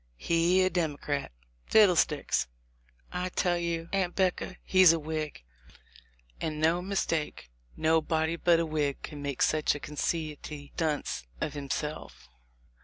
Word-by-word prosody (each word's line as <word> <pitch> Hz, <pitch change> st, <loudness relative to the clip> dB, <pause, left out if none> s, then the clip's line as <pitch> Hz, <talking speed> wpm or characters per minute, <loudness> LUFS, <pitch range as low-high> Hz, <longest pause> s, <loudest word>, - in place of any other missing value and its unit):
He 170 Hz, -, +3 dB
a 185 Hz, -, +2 dB
Democrat! 150 Hz, -4 st, -2 dB, 0.4 s
Fiddlesticks! 165 Hz, -, +3 dB, 0.6 s
I 180 Hz, +1 st, -2 dB
tell 175 Hz, -1 st, +1 dB
you, 170 Hz, -1 st, -2 dB
Aunt 190 Hz, -3 st, 0 dB
'Becca, 185 Hz, -2 st, 0 dB
he's 185 Hz, -3 st, +7 dB
a 165 Hz, -, -1 dB
Whig, 155 Hz, -, -4 dB, 1.0 s
and 155 Hz, -1 st, -2 dB
no 165 Hz, +3 st, +3 dB
mistake: 165 Hz, -, -2 dB, 0.3 s
nobody 160 Hz, 0 st, +2 dB
but 170 Hz, 0 st, +3 dB
a 170 Hz, -, +1 dB
Whig 150 Hz, -3 st, -1 dB
could 150 Hz, -, -7 dB
make 140 Hz, -2 st, -1 dB
such 155 Hz, -1 st, +2 dB
a -, -, -5 dB
conceity 150 Hz, -1 st, -4 dB
dunce 150 Hz, -, -2 dB
of 155 Hz, -, -2 dB
himself." 140 Hz, -, -5 dB
160 Hz, 125 wpm, -29 LUFS, 150-175 Hz, 1.0 s, he's